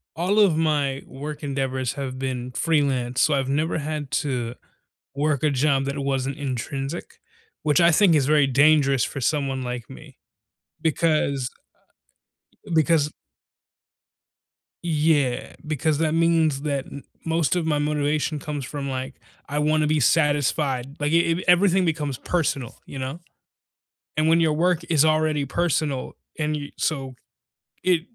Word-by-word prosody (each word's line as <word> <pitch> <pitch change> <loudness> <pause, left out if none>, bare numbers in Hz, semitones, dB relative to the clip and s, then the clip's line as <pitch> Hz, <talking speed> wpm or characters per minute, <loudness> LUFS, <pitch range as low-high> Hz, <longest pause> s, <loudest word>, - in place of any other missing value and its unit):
all 185 +6 +1
of 190 -7 +5
my 145 -4 0
work 150 +3 -7
endeavors 135 -2 -2
have 135 -2 -5
been 130 -1 -4
freelance, 130 -4 0
so 155 - +3
I've 135 -1 0
never 150 +5 0
had 150 -2 -4
to 125 -5 -3 0.6
work 145 0 0
a 155 - +4
job 140 0 +2
that 140 +1 -3
wasn't 135 -1 -1
intrinsic, 135 +2 -4 0.4
which 150 +1 +3
I 170 0 +6
think 175 0 +5
is 145 -3 +3
very 150 -1 +4
dangerous 140 -1 +4
for 140 - -4
someone 135 -1 -1
like 125 -1 -5
me 135 0 -13 0.6
because 155 -5 +1 1.2
because 160 -2 +3 1.7
Yeah, 150 -6 +1
because 155 0 0
that 155 -1 +1
means 165 -4 +2
that 140 -3 -2
m 140 - -10 0.2
most 165 +1 +1
of 175 - 0
my 155 -2 +1
motivation 150 +1 0
comes 145 -2 -5
from, 140 0 -5
like, 130 +1 -4 0.3
"I 145 - -2
wanna 155 +1 +2
be 155 0 +1
satisfied." 145 -3 +1
Like, 145 +1 0
i - - +5
if 165 0 +2
everything 185 +1 +5
becomes 150 -6 -1
personal, 140 -8 -2
you 140 - -8
know? 135 +5 -5 1.0
And 155 +1 +2
when 165 +1 +4
your 160 -2 +3
work 175 +2 +1
is 155 -2 +4
already 155 -2 +2
personal 150 -3 -1 0.2
and 150 -1 -1
you 145 -1 -7
so 135 -5 -2 0.7
it 180 -3 +3
150 Hz, 145 wpm, -24 LUFS, 135-155 Hz, 1.7 s, I